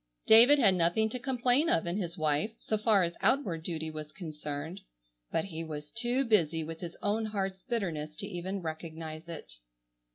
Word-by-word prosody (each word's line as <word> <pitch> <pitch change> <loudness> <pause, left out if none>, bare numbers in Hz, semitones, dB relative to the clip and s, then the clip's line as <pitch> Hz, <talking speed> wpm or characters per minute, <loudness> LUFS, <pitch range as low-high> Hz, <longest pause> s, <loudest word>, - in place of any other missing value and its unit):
David 240 +6 +8
had 210 -9 +5
nothing 180 +5 +2
to 250 - -4
complain 255 +4 +2
of 165 - +2
in 170 +3 -1
his 175 -3 -3
wife, 155 +7 +1
so 215 - -2
far 210 -2 +4
as 170 0 -1
outward 190 - +1
duty 160 -1 -3
was 155 -1 -7
concerned, 155 +1 -6 0.5
but 165 - 0
he 165 -4 -5
was 150 -2 -7
too 245 +4 0
busy 165 -8 +2
with 165 +1 -7
his 175 -1 -7
own 220 +2 +1
heart's 195 -3 -3
bitterness 165 -11 -3
to - - -5
even 185 +2 -4
recognize 160 0 -6
it. 145 - -8
175 Hz, 175 wpm, -30 LUFS, 160-220 Hz, 0.5 s, David